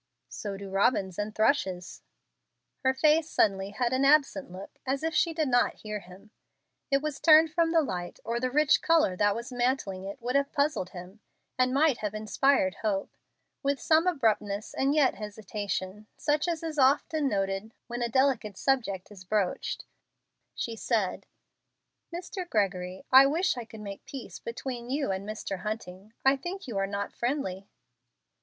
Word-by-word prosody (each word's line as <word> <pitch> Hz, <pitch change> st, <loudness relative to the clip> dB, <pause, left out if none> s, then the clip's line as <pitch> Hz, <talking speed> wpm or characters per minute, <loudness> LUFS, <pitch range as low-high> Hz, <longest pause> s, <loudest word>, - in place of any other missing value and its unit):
"So 200 Hz, -2 st, -5 dB
do 195 Hz, -1 st, -8 dB
robins 195 Hz, -2 st, +1 dB
and 210 Hz, +1 st, -3 dB
thrushes." 195 Hz, -7 st, 0 dB, 0.8 s
Her 260 Hz, -, +3 dB
face 305 Hz, +4 st, +3 dB
suddenly 195 Hz, -2 st, +2 dB
had 235 Hz, +4 st, -1 dB
an 260 Hz, +1 st, +2 dB
absent 285 Hz, -3 st, +3 dB
look 185 Hz, +2 st, -10 dB
as 270 Hz, +2 st, -2 dB
if 320 Hz, 0 st, -1 dB
she 335 Hz, +2 st, +3 dB
did 315 Hz, -2 st, 0 dB
not 245 Hz, -1 st, +2 dB
hear 210 Hz, -1 st, -5 dB
him. 190 Hz, +3 st, -15 dB, 0.6 s
It 275 Hz, +1 st, +2 dB
was 305 Hz, -2 st, -3 dB
turned 315 Hz, 0 st, +7 dB
from 330 Hz, 0 st, +2 dB
the 330 Hz, -2 st, +4 dB
light, 175 Hz, -9 st, -5 dB
or 235 Hz, +1 st, -1 dB
the 255 Hz, +1 st, 0 dB
rich 300 Hz, +2 st, +4 dB
color 325 Hz, -, +3 dB
that 205 Hz, 0 st, +3 dB
was 235 Hz, +2 st, -6 dB
mantling 245 Hz, -6 st, -1 dB
it 200 Hz, +6 st, -7 dB
would 245 Hz, +2 st, -3 dB
have 280 Hz, 0 st, +2 dB
puzzled 285 Hz, -10 st, 0 dB
him, 185 Hz, +3 st, -10 dB, 0.4 s
and 255 Hz, 0 st, +2 dB
might 280 Hz, -1 st, +3 dB
have 210 Hz, -1 st, -3 dB
inspired 215 Hz, 0 st, +2 dB
hope. 200 Hz, -3 st, -1 dB, 0.5 s
With 280 Hz, -1 st, 0 dB
some 320 Hz, +2 st, +3 dB
abruptness 215 Hz, -, 0 dB
and 275 Hz, +2 st, +1 dB
yet 285 Hz, -4 st, +4 dB
hesitation, 210 Hz, -1 st, -5 dB
such 295 Hz, +3 st, +1 dB
as 335 Hz, -2 st, -2 dB
is 315 Hz, -2 st, -3 dB
often 285 Hz, +2 st, +3 dB
noted 195 Hz, 0 st, -2 dB
when 240 Hz, 0 st, -5 dB
a 235 Hz, -, 0 dB
delicate 240 Hz, -6 st, +1 dB
subject 225 Hz, -9 st, 0 dB
is 195 Hz, -3 st, -11 dB
broached, 195 Hz, -1 st, -1 dB, 0.7 s
she 230 Hz, -, -3 dB
said, 220 Hz, -4 st, -1 dB, 0.8 s
"Mr. 355 Hz, +1 st, -6 dB
Gregory, 190 Hz, -, -1 dB
I 265 Hz, +1 st, +9 dB
wish 340 Hz, +5 st, +1 dB
I 240 Hz, -2 st, -6 dB
could 220 Hz, -1 st, -11 dB
make 200 Hz, -1 st, -8 dB
peace 270 Hz, -4 st, -8 dB
between 240 Hz, 0 st, -6 dB
you 275 Hz, -4 st, 0 dB
and 190 Hz, +2 st, -4 dB
Mr. 205 Hz, -3 st, -4 dB
Hunting. 210 Hz, -1 st, -6 dB
I 270 Hz, +1 st, +5 dB
think 360 Hz, +6 st, -6 dB
you 235 Hz, -, -5 dB
are 195 Hz, -, 0 dB
not 200 Hz, 0 st, -4 dB
friendly." 235 Hz, -7 st, -2 dB
235 Hz, 170 wpm, -28 LUFS, 200-280 Hz, 0.8 s, I